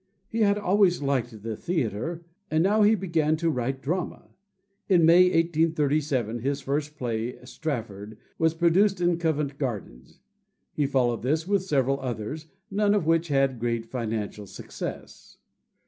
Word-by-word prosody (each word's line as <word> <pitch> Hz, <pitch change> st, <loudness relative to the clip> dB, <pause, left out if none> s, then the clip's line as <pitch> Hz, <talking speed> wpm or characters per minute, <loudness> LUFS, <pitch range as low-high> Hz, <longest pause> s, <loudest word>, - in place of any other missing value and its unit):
He 230 Hz, -, -3 dB
had 205 Hz, -2 st, +3 dB
always 190 Hz, -5 st, +2 dB
liked 120 Hz, -6 st, -2 dB
the 110 Hz, -1 st, -3 dB
theater, 165 Hz, -, -3 dB, 0.2 s
and 155 Hz, +1 st, +2 dB
now 210 Hz, +3 st, +3 dB
he 210 Hz, +1 st, +5 dB
began 165 Hz, -5 st, 0 dB
to 165 Hz, 0 st, +1 dB
write 135 Hz, 0 st, -3 dB
drama. 175 Hz, +6 st, -3 dB, 0.6 s
In 175 Hz, -4 st, +5 dB
May, 175 Hz, +3 st, +7 dB
1837, 155 Hz, -, +1 dB
his 140 Hz, +4 st, -1 dB
first 145 Hz, +2 st, -3 dB
play, 120 Hz, -1 st, -3 dB
"Strafford," 115 Hz, -7 st, -5 dB, 0.2 s
was 160 Hz, 0 st, +2 dB
produced 180 Hz, +4 st, +3 dB
in 175 Hz, -1 st, +1 dB
Covent 150 Hz, -4 st, -1 dB
Garden. 105 Hz, -, -4 dB, 0.7 s
He 145 Hz, -2 st, 0 dB
followed 125 Hz, -4 st, +1 dB
this 155 Hz, +7 st, 0 dB
with 200 Hz, -1 st, +2 dB
several 140 Hz, -6 st, +1 dB
others, 130 Hz, +5 st, -5 dB, 0.2 s
none 205 Hz, +1 st, +2 dB
of 200 Hz, -6 st, 0 dB
which 165 Hz, +1 st, +2 dB
had 135 Hz, -4 st, +1 dB
great 115 Hz, -1 st, -1 dB
financial 110 Hz, -4 st, -4 dB
success. -, -, -8 dB
150 Hz, 145 wpm, -26 LUFS, 125-170 Hz, 0.7 s, May